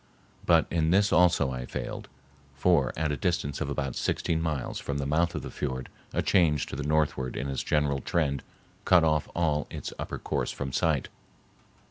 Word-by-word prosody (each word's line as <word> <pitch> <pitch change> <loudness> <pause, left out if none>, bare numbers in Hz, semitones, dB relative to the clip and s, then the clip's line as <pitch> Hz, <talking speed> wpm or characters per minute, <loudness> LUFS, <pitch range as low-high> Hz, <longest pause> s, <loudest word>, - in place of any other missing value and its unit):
But 85 -2 +5
in 80 -1 +2
this 100 +4 +3
also 85 -6 +4
I 60 -1 -5
failed; - - -5 0.5
for 85 -8 +3
at 80 -1 0
a - - 0
distance 75 -5 -1
of 75 - -1
about 70 -3 -2
sixteen 80 -1 0
miles 75 -6 -2
from 70 - -3
the 70 - -2
mouth 85 +4 +1
of - - -3
the - - -6
fiord 65 -3 -4 0.2
a - - 0
change 75 -6 +3
to - - -7
the 70 - -4
northward 75 -3 0
in 70 - -2
its 70 -1 -2
general 75 -2 +1
trend 75 -4 0 0.4
cut 90 -3 +5
off 75 -2 +1
all 75 -3 +1
its - - -6
upper - - -4
course - - -2
from 65 -2 -4
sight. 75 -5 +1
75 Hz, 185 wpm, -28 LUFS, 70-85 Hz, 0.5 s, But